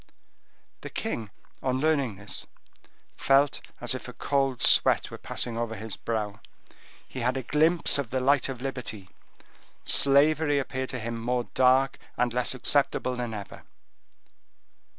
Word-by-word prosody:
The - - -7
king, 115 - -4 0.3
on 130 0 0
learning 140 -7 +1
this, 100 +2 -6 0.7
felt 140 +1 +3 0.2
as - - -2
if - - -6
a - - -8
cold 135 -3 0
sweat - - +5
were - - -8
passing 115 -1 -2
over 115 -1 -3
his 110 0 -6
brow;—he 110 +3 -7
had 125 +2 0
had - - -1
a 130 - -3
glimpse 160 0 +3
of 135 -5 -3
the 130 - -1
light 135 +1 +2
of 130 -1 -6
liberty; 120 -7 -6 0.7
slavery 145 +2 +4
appeared 130 -1 -3
to 130 - -4
him 115 0 -4
more 125 +1 0
dark 130 +1 +3 0.2
and 120 -1 +1
less 125 +1 0
acceptable 130 -1 0
than 120 -2 -4
ever. 100 -2 -8
130 Hz, 145 wpm, -27 LUFS, 115-140 Hz, 0.7 s, sweat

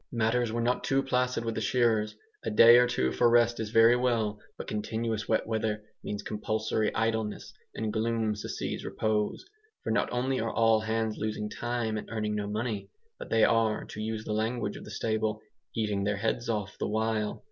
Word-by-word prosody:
Matters 115 0 +1
were 115 +1 -1
not 125 +1 +1
too 135 0 +2
placid 125 -2 0
with 115 - -1
the - - -3
shearers. 115 -4 +2 0.3
A - - -1
day 120 - +8
or 125 0 +5
two 65 - 0
for 120 - +3
rest 120 0 +4
is 110 -1 -3
very 115 +2 +6
well, 115 -4 0 0.2
but - - -6
continuous 110 +1 -2
wet - - +2
weather 110 -1 -1 0.2
means 105 -1 -4
compulsory 110 0 -1
idleness, 110 -2 -1 0.2
and 110 -1 -2
gloom 110 -1 0
succeeds 105 - -4
repose; 110 - -1 0.4
for - - -2
not - - +1
only 130 +2 0
are 115 - -1
all 115 -1 +4
hands 110 0 -1
losing 105 -1 -3
time 120 -2 -2
and - - -10
earning 105 -1 -2
no 105 -1 -2
money, 105 -2 -3 0.3
but - - -8
they 115 -1 +3
are, 110 -2 +2
to 105 - -7
use 110 0 -3
the 105 - -2
language 110 +3 -1
of - - -9
the - - -10
stable 110 -1 -1 0.4
"eating 105 -3 0
their 100 0 0
heads 115 +3 -1
off" 105 -3 -3
the - - -1
while. 110 0 -1
110 Hz, 190 wpm, -29 LUFS, 105-115 Hz, 0.4 s, day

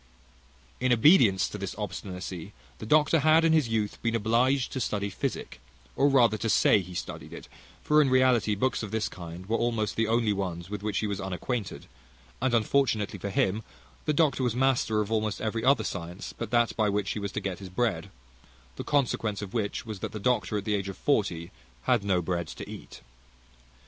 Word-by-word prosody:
In 130 0 +1
obedience 120 - +5
to 105 - -7
this 100 -1 -5
obstinacy 95 -2 -6 0.3
the 110 - -7
doctor 150 +4 +4
had 155 +2 +5
in 165 - +4
his 155 -6 +3
youth 110 -2 -2
been 115 -1 0
obliged 120 +4 +2
to 130 - -3
study 100 -4 -2
physic, 65 - -4 0.3
or 140 - +4
rather 120 -6 +4
to 115 - -1
say 105 - +5
he 90 -1 -8
studied - - -6
it; - - -9 0.4
for 150 0 +4
in 140 - +2
reality 130 -5 +3
books 130 +4 0
of 105 - -5
this 110 +1 -1
kind 85 0 -9
were 115 +3 0
almost 115 -3 0
the 115 0 +1
only 115 -1 +2
ones 90 -2 -4
with 105 -1 -4
which 105 -1 -2
he - - 0
was 100 -2 -3
unacquainted; 95 +4 -4 0.6
and 130 -2 +2
unfortunately 115 -2 +1
for 100 - -4
him, 100 +2 +1 0.4
the - - +2
doctor 150 -3 +2
was 120 -3 0
master 125 -4 +2
of 105 +1 -4
almost 110 -2 0
every 110 +1 -2
other 135 +3 +4
science 90 +1 -6
but 115 - -5
that 120 0 +2
by 110 -2 +2
which 100 0 -1
he - - -3
was 100 -1 -4
to - - -3
get 95 -3 -4
his 95 -2 -8
bread; 110 +3 -1 0.7
the - - -4
consequence 115 -7 0
of 100 - -8
which 110 -2 -2
was, 110 -3 -6
that - - -5
the 110 - -5
doctor 105 -3 0
at 100 - -4
the 105 - 0
age 100 -1 -1
of 95 - -7
forty 95 - 0 0.3
had 120 - +2
no 95 -3 +1
bread 85 0 -2
to - - -8
eat. - - -10
110 Hz, 205 wpm, -28 LUFS, 100-125 Hz, 0.7 s, obedience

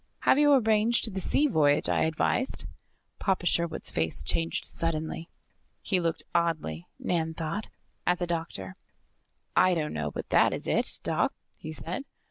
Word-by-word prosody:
Have 275 - +4
you 295 0 +5
arranged 225 -2 +2
the 190 - -2
sea 280 +10 +3
voyage 150 - +3
I - - +2
advised?" 160 +11 -1 0.5
Papa 190 -2 0
Sherwood's 170 -1 0
face 80 -3 -1
changed 80 +2 0
suddenly. 165 0 -2 0.5
He 190 - 0
looked 165 -1 -1
oddly, 160 - -1
Nan 160 -2 -1
thought, 165 +7 -3 0.4
at 180 - +3
the 175 - -1
doctor. 165 - -4 0.8
"I 185 -1 +5
don't 155 -2 -2
know 75 -1 -2
but - - -7
that - - +4
is - - -7
it, - - +3
Doc," - - +1 0.2
he 155 - -8
said. 170 - -4
165 Hz, 150 wpm, -28 LUFS, 155-190 Hz, 0.8 s, you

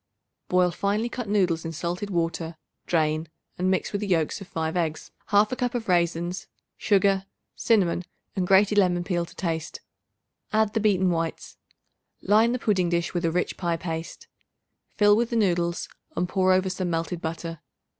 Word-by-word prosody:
Boil 180 -1 +3
finely 205 +6 -1
cut 240 -3 -5
noodles 180 -6 +2
in 165 - -4
salted 175 +5 -3
water 165 -2 -2 0.3
drain 155 -1 +1 0.3
and 185 +1 +1
mix 190 - 0
with 205 - -2
the 205 - -2
yolks 170 0 0
of 195 - -9
5 160 0 -3
eggs, 160 -3 -2 0.2
1/2 210 +4 +4
cup 245 -1 -2
of 230 -2 -3
raisins, 175 0 0 0.3
sugar, 195 -1 +2 0.3
cinnamon, 185 -6 +2 0.3
and 185 -2 0
grated 205 +2 +5
lemon 175 -2 +2
peel 175 -2 -1
to - - -16
taste. 165 -3 -3 0.7
Add 215 -1 +2
the 225 - +1
beaten 190 -4 +3
whites. 165 -1 -3 0.7
Line 220 +3 +4
the 250 - 0
pudding 190 -7 +1
dish 170 0 -1
with 175 -1 -1
a 165 - +2
rich 180 +2 -1
pie 170 -2 -1
paste. 165 -1 -6 0.7
Fill 205 0 +5
with 235 +1 +1
the 235 - -2
noodles 175 -5 +1 0.3
and 180 - 0
pour 185 0 +2
over 185 0 +2
some 185 -1 -2
melted 165 +1 -2
butter. 165 0 -5
180 Hz, 170 wpm, -26 LUFS, 170-205 Hz, 0.7 s, grated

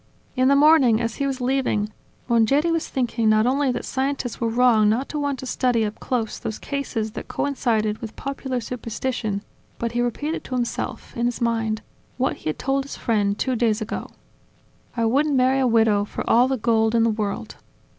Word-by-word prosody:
In 255 0 +3
the 280 - +5
morning, 280 -6 +5
as 230 -1 -2
he 280 - 0
was 270 -1 -3
leaving, 250 -5 0 0.4
Mongeri 265 +8 +3
was 330 -1 0
thinking 235 -3 0
not 215 +1 +4
only 270 +1 +2
that - - -4
scientists 265 -2 -2
were 230 - +1
wrong 225 -3 +4
not 245 +6 0
to 300 - -3
want 285 -2 -1
to 260 - -7
study 245 -3 +1
up 210 - -5
close 235 -4 -2
those 215 - -4
cases 255 -6 -3
that - - -7
coincided 225 -6 0
with 225 -2 -7
popular 270 -2 -3
superstition, 230 -3 -3 0.3
but 235 -1 -2
he 240 +1 0
repeated 290 +7 -2
to 255 - -4
himself, 245 0 -3
in 235 0 +1
his 245 - -3
mind, 225 -2 0 0.3
what 260 +1 0
he - - -4
had 155 - -3
told 270 +1 0
his 280 - -8
friend 205 -3 0
two 260 -1 0
days 225 -2 +1
ago: 220 -1 -5 0.9
I 230 - +2
wouldn't 280 +5 +2
marry 260 +1 +3
a 260 - +3
widow 220 -3 +3
for - - -6
all 245 +2 +5
the 265 0 0
gold 225 0 +2
in 230 - +4
the 230 - +3
world. 210 -2 -4
240 Hz, 195 wpm, -23 LUFS, 220-265 Hz, 0.9 s, the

